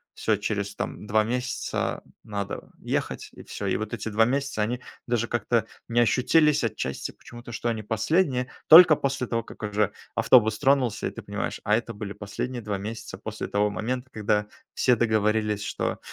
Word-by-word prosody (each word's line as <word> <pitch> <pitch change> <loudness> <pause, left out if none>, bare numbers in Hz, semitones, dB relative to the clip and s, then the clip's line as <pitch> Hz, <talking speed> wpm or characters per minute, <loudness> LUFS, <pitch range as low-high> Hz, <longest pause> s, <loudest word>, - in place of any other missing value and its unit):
всё, 110 - +1
через 105 -1 -3
там 105 - -5
2 110 +1 +3
месяца 125 +3 -2 0.2
надо 100 -1 -5
ехать. - - -3
И - - -12
всё, - - -5
и - - +1
вот 110 +2 -5
эти 110 0 -3
2 110 +2 +4
месяца- 135 -2 -1
они 120 +4 -1 0.3
даже 120 -1 0
как-то 120 -2 +1 0.2
не 120 0 +3
ощутились 150 +5 +3
отчасти 70 -10 -3
почему-то, 120 0 -12
что 120 - -2
они 110 -2 -2
последние, 125 - +1 0.2
только 160 -1 +10
после 135 -3 -1
того, 115 -1 -1
как - - -12
уже 105 -1 0 0.2
автобус 110 -4 +5
тронулся 130 -5 +2
и - - -4
ты - - -8
понимаешь: - - -4
"A 105 - +3
это 115 -1 -5
были 105 -1 -6
последние 110 +5 -5
2 105 -2 -3
месяца 105 -1 -6
после 110 +2 -5
того 105 +1 +1
момента, 125 +5 -3
когда 105 -1 0 0.3
все 125 - +3
договорились, 105 -2 +1
что - - -2
110 Hz, 175 wpm, -26 LUFS, 105-125 Hz, 0.3 s, только